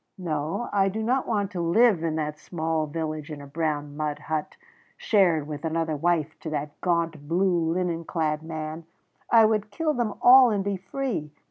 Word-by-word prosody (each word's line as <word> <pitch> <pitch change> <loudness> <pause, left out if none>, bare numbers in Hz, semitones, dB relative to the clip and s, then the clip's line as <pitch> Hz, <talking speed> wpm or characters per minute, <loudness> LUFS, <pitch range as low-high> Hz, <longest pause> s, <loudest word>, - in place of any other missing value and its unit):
No, 160 +3 -2
I 195 -1 +3
do 220 +3 -3
not 255 +4 0
want 205 -3 -1
to 180 - -3
live 190 +2 +4
in 160 -2 -1
that 150 -1 -3
small 160 -2 -2
village 155 0 -4
in 150 -2 -6
a 140 - -9
brown 145 -1 -3
mud 150 -1 -2
hut, 155 0 -4 0.4
shared 175 -8 +2
with 150 -1 -6
another 160 -1 -1
wife 160 0 0
to 160 - -6
that 150 -1 -5
gaunt 165 -4 -1
blue 170 -1 +1
linen 170 -1 -1
clad 155 -2 -1
man; 155 0 -6 0.4
I 225 -1 +7
would 215 -1 +1
kill 310 +7 -1
them 235 -5 -1
all 255 0 +8
and 205 -3 0
be 200 0 -1
free. 195 - -4
165 Hz, 180 wpm, -26 LUFS, 155-200 Hz, 0.4 s, all